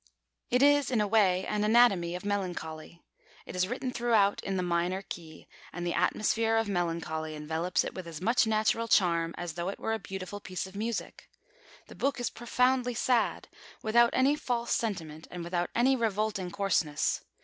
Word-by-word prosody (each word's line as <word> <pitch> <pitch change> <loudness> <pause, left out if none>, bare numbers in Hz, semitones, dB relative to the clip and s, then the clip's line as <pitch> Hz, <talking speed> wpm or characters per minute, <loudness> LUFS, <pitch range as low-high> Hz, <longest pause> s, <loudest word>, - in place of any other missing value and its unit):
It 250 +2 +3
is 290 -1 +5
in 245 -4 +1
a 210 - +2
way 195 -3 +3
an 210 0 -1
anatomy 210 -6 +4
of 180 - -7
melancholy. 175 -5 -4 0.4
It - - -8
is 180 0 +1
written 255 +3 -3
throughout 225 -5 +2
in 195 -1 -2
the 180 - 0
minor 175 +2 0
key, 160 -4 -10 0.2
and 175 0 -5
the 175 - -1
atmosphere 225 +1 +1
of 225 -1 +1
melancholy 165 -4 -2
envelops 160 +4 -1
it - - -5
with 185 -2 -7
as 160 -2 -7
much 230 +5 +2
natural 220 +1 +1
charm 170 -5 +2
as 175 -2 -4
though 170 +3 -3
it 200 - -5
were 225 - -1
a 225 - -2
beautiful 190 0 -6
piece 185 -2 -5
of 190 +1 -12
music. 220 +1 -4 0.6
The - - -13
book 275 -1 -1
is 245 - -2
profoundly 250 +1 +1
sad, 240 0 +1 0.4
without 235 +2 +5
any 270 +3 +3
false 240 -5 -1
sentiment 165 -8 -3
and 175 -1 -6
without 175 0 -2
any 260 +3 +4
revolting 215 -5 -1
coarseness. 175 -6 0
200 Hz, 180 wpm, -29 LUFS, 175-230 Hz, 0.6 s, is